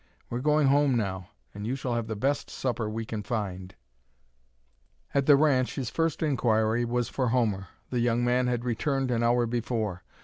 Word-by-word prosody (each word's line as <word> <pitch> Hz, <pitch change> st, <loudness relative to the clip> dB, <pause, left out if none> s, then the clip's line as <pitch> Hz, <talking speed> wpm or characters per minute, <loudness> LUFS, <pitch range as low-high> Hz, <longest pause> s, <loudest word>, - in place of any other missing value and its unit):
We're 120 Hz, -, -1 dB
going 150 Hz, +1 st, +3 dB
home 140 Hz, -1 st, +4 dB
now, 95 Hz, -4 st, -3 dB, 0.2 s
and 105 Hz, +1 st, -6 dB
you 125 Hz, -, -1 dB
shall 130 Hz, -2 st, -3 dB
have 115 Hz, -1 st, -2 dB
the 110 Hz, -, -3 dB
best 140 Hz, +7 st, -1 dB
supper 120 Hz, -4 st, -2 dB
we 110 Hz, +1 st, -4 dB
can 110 Hz, -1 st, -4 dB
find." 95 Hz, -5 st, -4 dB, 1.4 s
At 140 Hz, -1 st, +1 dB
the 145 Hz, -, +8 dB
ranch 140 Hz, -4 st, +2 dB
his 130 Hz, -4 st, -3 dB
first 165 Hz, -1 st, 0 dB
inquiry 120 Hz, -5 st, +2 dB
was 120 Hz, 0 st, 0 dB
for 130 Hz, -2 st, -1 dB
Homer. 110 Hz, -6 st, 0 dB, 0.2 s
The 125 Hz, -, 0 dB
young 120 Hz, 0 st, +1 dB
man 125 Hz, +1 st, +2 dB
had 120 Hz, -1 st, -1 dB
returned 130 Hz, +2 st, 0 dB
an 115 Hz, -1 st, +1 dB
hour 120 Hz, +1 st, +3 dB
before. 115 Hz, -5 st, -2 dB
120 Hz, 180 wpm, -28 LUFS, 110-130 Hz, 1.4 s, the